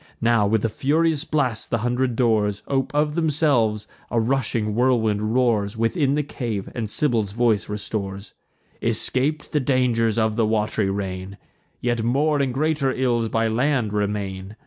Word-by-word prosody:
Now, 115 Hz, -3 st, +3 dB
with 110 Hz, +1 st, +1 dB
a -, -, +1 dB
furious 155 Hz, +6 st, +1 dB
blast, 140 Hz, -8 st, -1 dB
the 115 Hz, -, +1 dB
hundred 125 Hz, 0 st, 0 dB
doors 110 Hz, -4 st, +1 dB
Ope 135 Hz, -1 st, -1 dB
of 150 Hz, 0 st, +1 dB
themselves; 140 Hz, -10 st, +1 dB, 0.2 s
a 120 Hz, -, +1 dB
rushing 115 Hz, -3 st, 0 dB
whirlwind 110 Hz, -3 st, +1 dB
roars 115 Hz, -4 st, +1 dB
Within 135 Hz, +5 st, +1 dB
the 150 Hz, -, 0 dB
cave, 115 Hz, -8 st, -4 dB
and 110 Hz, -3 st, -3 dB
Sibyl's 110 Hz, -6 st, +1 dB
voice 115 Hz, -3 st, +1 dB
restores: 100 Hz, -1 st, -4 dB, 0.5 s
"Escap'd 145 Hz, +4 st, 0 dB
the 150 Hz, -, +3 dB
dangers 125 Hz, -4 st, +1 dB
of 110 Hz, -1 st, +1 dB
the 115 Hz, -, +3 dB
wat'ry 105 Hz, -2 st, 0 dB
reign, 95 Hz, 0 st, -4 dB, 0.4 s
Yet 120 Hz, -1 st, 0 dB
more 145 Hz, +6 st, +1 dB
and 135 Hz, -2 st, 0 dB
greater 145 Hz, 0 st, 0 dB
ills 120 Hz, -3 st, 0 dB
by 115 Hz, 0 st, +1 dB
land 120 Hz, -1 st, 0 dB
remain. 100 Hz, -1 st, -3 dB
115 Hz, 150 wpm, -23 LUFS, 105-135 Hz, 0.5 s, Now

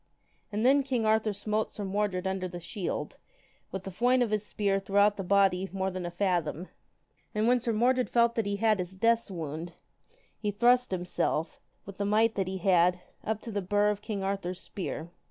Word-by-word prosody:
And 215 Hz, +3 st, -1 dB
then 275 Hz, +2 st, +6 dB
king 255 Hz, -4 st, -1 dB
Arthur 220 Hz, 0 st, +2 dB
smote 210 Hz, +2 st, -2 dB
Sir 205 Hz, -, -5 dB
Mordred 195 Hz, -1 st, -1 dB
under 190 Hz, -1 st, -1 dB
the 175 Hz, -1 st, -7 dB
shield, 175 Hz, +2 st, -4 dB, 0.5 s
with 190 Hz, -1 st, -5 dB
a 195 Hz, -, -5 dB
foin 245 Hz, +6 st, +3 dB
of 225 Hz, -, -2 dB
his 215 Hz, -1 st, 0 dB
spear 200 Hz, -2 st, 0 dB
throughout 200 Hz, +1 st, +3 dB
the 195 Hz, -, -4 dB
body 190 Hz, 0 st, +3 dB
more 190 Hz, 0 st, -1 dB
than 185 Hz, -1 st, -4 dB
a -, -, -3 dB
fathom. 175 Hz, -2 st, -1 dB, 0.7 s
And 215 Hz, +1 st, +2 dB
when 250 Hz, +1 st, +4 dB
Sir 240 Hz, 0 st, -1 dB
Mordred 250 Hz, +3 st, +2 dB
felt 235 Hz, -1 st, +3 dB
that 225 Hz, -3 st, -1 dB
he 200 Hz, -, 0 dB
had 215 Hz, -1 st, +2 dB
his 180 Hz, +1 st, -4 dB
death's 230 Hz, +3 st, +2 dB
wound, 165 Hz, -1 st, -5 dB, 0.7 s
he 210 Hz, -, -1 dB
thrust 245 Hz, +4 st, +3 dB
himself, 180 Hz, -3 st, -2 dB, 0.2 s
with 200 Hz, -1 st, -10 dB
the 200 Hz, -, 0 dB
might 220 Hz, +2 st, +3 dB
that 195 Hz, -3 st, -1 dB
he 190 Hz, 0 st, -3 dB
had, 180 Hz, -1 st, +3 dB, 0.2 s
up 220 Hz, -1 st, -2 dB
to 230 Hz, -, -7 dB
the 205 Hz, -1 st, -1 dB
bur 205 Hz, +2 st, +2 dB
of 205 Hz, 0 st, -5 dB
king 205 Hz, -2 st, -4 dB
Arthur's 190 Hz, -2 st, -2 dB
spear. 170 Hz, -4 st, -6 dB
200 Hz, 200 wpm, -29 LUFS, 185-220 Hz, 0.7 s, then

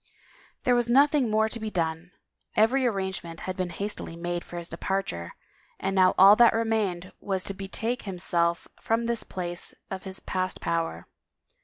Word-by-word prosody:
There 250 Hz, -, +3 dB
was 240 Hz, -1 st, +2 dB
nothing 275 Hz, 0 st, +4 dB
more 215 Hz, 0 st, +3 dB
to 230 Hz, +1 st, -6 dB
be 220 Hz, -1 st, -3 dB
done; 165 Hz, -2 st, -2 dB, 0.5 s
every 250 Hz, +4 st, +4 dB
arrange 190 Hz, -5 st, -2 dB
ment 165 Hz, -1 st, -9 dB
had 185 Hz, -, -4 dB
been 185 Hz, -2 st, -2 dB
hastily 200 Hz, -1 st, -4 dB
made 175 Hz, 0 st, -3 dB
for 175 Hz, -, -9 dB
his 170 Hz, -1 st, -5 dB
departure 165 Hz, -, -3 dB, 0.5 s
and 195 Hz, 0 st, -1 dB
now 185 Hz, -1 st, +5 dB
all 195 Hz, +2 st, +9 dB
that 235 Hz, -1 st, +7 dB
remained 215 Hz, -6 st, 0 dB
was 190 Hz, -2 st, -2 dB
to 195 Hz, -, -4 dB
betake 220 Hz, +5 st, -3 dB
himself 175 Hz, -3 st, 0 dB
from 230 Hz, +1 st, 0 dB
this 235 Hz, -1 st, 0 dB
place 175 Hz, -1 st, -4 dB, 0.2 s
of 190 Hz, -1 st, -4 dB
his 190 Hz, 0 st, -3 dB
past 185 Hz, 0 st, -2 dB
power. 165 Hz, -1 st, -2 dB
190 Hz, 170 wpm, -27 LUFS, 175-225 Hz, 0.5 s, all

